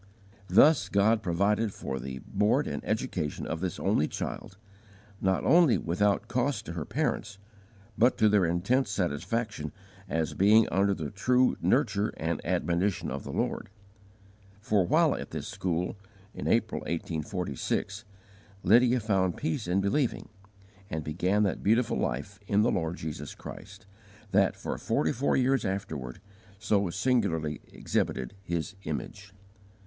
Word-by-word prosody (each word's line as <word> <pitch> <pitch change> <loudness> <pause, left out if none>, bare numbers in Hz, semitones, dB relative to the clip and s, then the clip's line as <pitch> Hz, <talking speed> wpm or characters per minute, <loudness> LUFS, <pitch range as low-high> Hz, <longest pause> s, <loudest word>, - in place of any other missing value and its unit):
Thus 150 +5 +5
God 105 +2 +3
provided 100 +4 +1
for 65 -7 -5
the 65 0 -6
board 105 +2 +2
and - - -4
education 75 -1 -2
of 80 - -3
this 90 -1 -3
only 75 - +2
child, 95 - -6 0.6
not 95 0 +1
only 170 -6 +5
without 100 +4 0
cost 125 -3 -1
to 85 - -6
her 80 -4 -4
parents, 105 -2 -2 0.6
but 120 +3 +3
to 110 - +4
their 105 -2 +4
intense 95 +9 +1
satisfaction 95 -1 -2 0.4
as 80 -1 -1
being 105 +3 +5
under 100 +1 +2
the 80 -5 -5
true 125 +5 +2
"nurture 110 -6 +1
and 80 -1 -2
admonition 90 +2 0
of - - -4
the - - -6
Lord;" - - -2 0.9
for 100 -3 +1
while - - +4
at - - -6
this - - -5
school, 90 0 -2 0.4
in - - -5
April, 110 -1 +1
1846, 85 - -3 0.6
Lydia 120 +5 +5
found 95 -5 0
peace 80 - -2
in 90 +2 +2
believing, 120 +6 0 0.6
and 80 0 -3
began 90 +7 +1
that 100 - -1
beautiful 115 +3 +2
life 70 +11 -3
in 105 +1 +3
the - - +3
Lord 80 -1 -1
Jesus 75 -2 -6
Christ, 100 +2 -10 0.5
that, 95 -2 +3
for - - -5
forty 80 +1 +1
four 135 +4 +1
years 135 0 +2
afterward, 80 - -4 0.4
so 100 -2 +1
singularly 95 - 0
exhibited 65 -2 -2
His 85 -2 -3
image. 100 -1 -5
100 Hz, 140 wpm, -29 LUFS, 85-110 Hz, 0.9 s, Thus